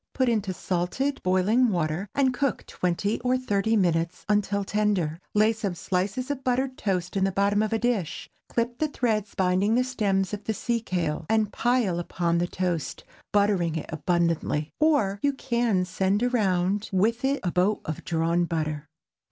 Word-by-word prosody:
Put 260 -2 +2
into 210 -4 0
salted 185 +11 -2
boiling 200 +7 +3
water, 175 +1 -1
and 265 -2 +3
cook 275 +1 -1
twenty 185 +4 -1
or 250 +1 +1
thirty 220 -3 0
minutes 170 -3 0
until 205 -1 +1
tender. 195 -6 0 0.2
Lay 215 +2 +4
some 205 -5 -3
slices 195 +10 -2
of 270 -2 -4
buttered 255 +1 0
toast 185 -5 -2
in 195 - +1
the 195 - +2
bottom 200 +2 +2
of 215 - 0
a 225 - +2
dish, 220 -9 -1 0.2
clip 240 +1 -1
the 310 - +2
threads 220 -7 -1
binding 190 +4 +2
the 250 - +3
stems 200 -7 0
of 205 0 -5
the 220 - -1
sea 235 +3 -1
kale, 165 -6 -2
and 220 -2 +1
pile 235 -8 +1
upon 170 -1 0
the 175 - 0
toast, 175 -4 -3 0.3
buttering 200 -5 +2
it 160 - -4
abundantly. 165 -2 0
Or, 260 -11 +2
you 285 0 +2
can 235 -8 0
send 190 +4 0
around 200 -4 +1
with 220 +6 +1
it 275 +1 +1
a 180 - 0
boat 190 +5 +1
of 155 - -5
drawn 170 +1 +1
butter. 155 -3 -3
200 Hz, 170 wpm, -26 LUFS, 180-235 Hz, 0.3 s, Lay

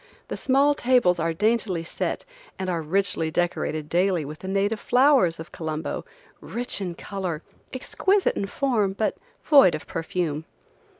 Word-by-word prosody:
The - - -3
small 275 +2 +3
tables 240 -10 +3
are 165 +1 0
daintily 210 -1 0
set 165 - -3 0.3
and 185 -1 -2
are 170 -2 -1
richly 165 0 0
decorated 160 -3 -1
daily 175 -1 +1
with 150 +2 -8
the 190 - -8
native 200 +3 0
flowers 245 - +4
of 160 - -9
Colombo, 160 -2 -4 0.3
rich 240 -3 -3
in 180 -3 -3
color, 180 -5 -4 0.3
exquisite 385 +9 +1
in 195 - -2
form, 215 -5 0
but 215 +2 -1 0.3
void 275 - +6
of 155 - -7
perfume. 160 -2 -3
190 Hz, 145 wpm, -25 LUFS, 165-235 Hz, 0.3 s, void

